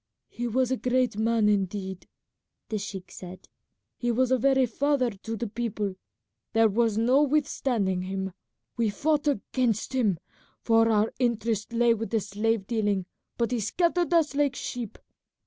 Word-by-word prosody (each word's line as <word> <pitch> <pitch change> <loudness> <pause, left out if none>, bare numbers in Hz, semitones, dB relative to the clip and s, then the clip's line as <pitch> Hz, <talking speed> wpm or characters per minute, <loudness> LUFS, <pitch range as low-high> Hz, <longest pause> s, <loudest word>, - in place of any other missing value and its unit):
"He 240 0 -4
was 255 +2 +1
a 260 - +1
great 250 -3 +1
man 220 0 +2
indeed," 190 -2 -1 0.6
the 215 - -1
sheik 195 -2 -7
said; 185 0 -10 0.5
"he 240 - -2
was 255 +2 +1
a 260 - +5
very 265 +1 +4
father 255 +1 +1
to 220 +3 -6
the 235 - -3
people; 210 -3 -3 0.6
there 225 0 +5
was 225 0 +1
no 250 +5 +4
withstanding 260 -10 +1
him. 190 0 -4 0.4
We 230 -2 +2
fought 295 +7 0
against 250 -3 0
him, 220 -9 +2 0.4
for 225 0 +3
our 215 0 +2
interest 225 -3 0
lay 235 0 +4
with 225 0 -4
the 225 - +1
slave 210 +1 -1
dealing, 205 -4 0 0.3
but 235 0 0
he 245 - 0
scattered 340 - +1
us 330 -4 +3
like 285 -2 +1
sheep. 240 -5 -5
230 Hz, 155 wpm, -27 LUFS, 205-255 Hz, 0.6 s, a